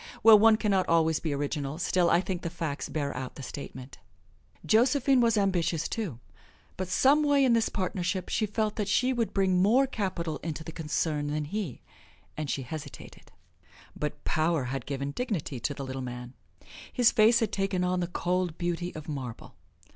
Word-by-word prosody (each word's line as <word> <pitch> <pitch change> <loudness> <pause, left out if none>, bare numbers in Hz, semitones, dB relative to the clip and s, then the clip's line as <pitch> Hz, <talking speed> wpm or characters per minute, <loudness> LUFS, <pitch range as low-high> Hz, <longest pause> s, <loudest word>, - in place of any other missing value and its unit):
Well, 220 -1 +9
one 220 0 +6
can 210 -2 0
not 190 -2 +1
always 160 -1 +3
be 160 - -3
original 145 0 -2
still 180 0 +2
I 170 - +4
think 185 -2 -4
the 170 - -3
facts 155 -3 -4
bear 145 -2 -2
out 125 0 -5
the 140 - -8
statement. 130 -1 -8 0.7
Josephine 255 +3 +4
was 230 -2 +3
ambitious, 175 -5 +1
too, 200 - -4 0.6
but 185 - -4
some 275 - +4
way 285 -2 +4
in 245 - +4
this 230 -1 +2
partnership 185 -1 -2
she 215 - 0
felt 215 +1 -1
that 210 -3 -1
she 250 +6 +2
would 235 -3 -1
bring 190 -2 +2
more 235 +8 +4
capital 185 - -3
into 160 -1 -5
the 165 - -7
concern 155 -2 -2
than 150 0 -2
he, 180 - -4 0.5
and 155 -2 -4
she 135 - -2
hesitated. 145 +2 -9 0.6
But 150 - -4
power 160 -2 +1
had 135 -3 -5
given 140 0 -3
dignity 165 - -3
to 140 +5 -2
the 135 - -5
Little 130 0 -5
Man; 125 0 -7 0.6
his 245 -2 +4
face 230 +1 +5
had 225 -4 0
taken 195 -2 -1
on 180 0 0
the 175 - -1
cold 180 -1 -1
beauty 175 0 -3
of 155 -1 -8
marble. 130 -6 -6
175 Hz, 185 wpm, -28 LUFS, 150-215 Hz, 0.7 s, Well